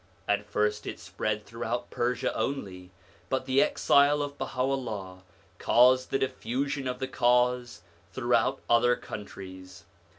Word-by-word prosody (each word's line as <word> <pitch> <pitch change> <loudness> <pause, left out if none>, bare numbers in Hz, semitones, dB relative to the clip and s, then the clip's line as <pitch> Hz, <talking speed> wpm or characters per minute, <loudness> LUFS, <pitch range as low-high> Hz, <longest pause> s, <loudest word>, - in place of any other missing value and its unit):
At 105 0 0
first 105 +1 0
it - - -5
spread 105 -1 -3
throughout 120 +1 -4
Persia 125 +1 -1
only, 95 -10 -3 0.4
but 130 0 -1
the 130 +1 +3
exile 145 +1 +4
of 145 0 -5
Baha'u'llah 125 -9 -3 0.4
caused 130 +1 +4
the - - +1
diffusion 135 +1 -2
of 125 0 -2
the 130 +1 -3
Cause 125 -2 +1 0.3
through - - -1
out - - +2
other 120 +1 +4
countries. 95 -4 -9
125 Hz, 130 wpm, -28 LUFS, 105-130 Hz, 0.4 s, exile